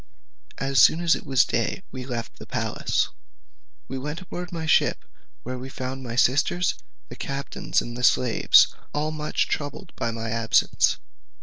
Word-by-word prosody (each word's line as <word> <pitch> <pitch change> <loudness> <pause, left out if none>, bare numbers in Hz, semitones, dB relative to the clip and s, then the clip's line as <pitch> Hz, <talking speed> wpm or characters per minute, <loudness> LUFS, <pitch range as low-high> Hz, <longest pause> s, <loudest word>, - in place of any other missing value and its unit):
As 135 0 +2
soon 160 - +6
as 170 -1 +3
it - - -4
was 135 -2 +4
day 120 +10 -1
we 130 -1 -7
left 120 -3 -5
the - - -10
palace, - - -1 0.8
and 130 0 -5
went 150 +4 -4
aboard 180 0 -7
my 165 -2 -4
ship, 155 - +2 0.4
where 125 +1 -5
we 130 +1 -7
found 130 0 -5
my 120 -2 -6
sisters, 145 +8 +2 0.4
the - - -8
captain, 140 0 -6
and 120 - -7
the 125 - -5
slaves, 125 -1 +5 0.2
all 150 +1 0
much 155 -1 -1
troubled 145 -1 -4
at 115 - 0
my 115 -1 -4
absence. 115 0 +2
135 Hz, 165 wpm, -25 LUFS, 125-155 Hz, 0.8 s, soon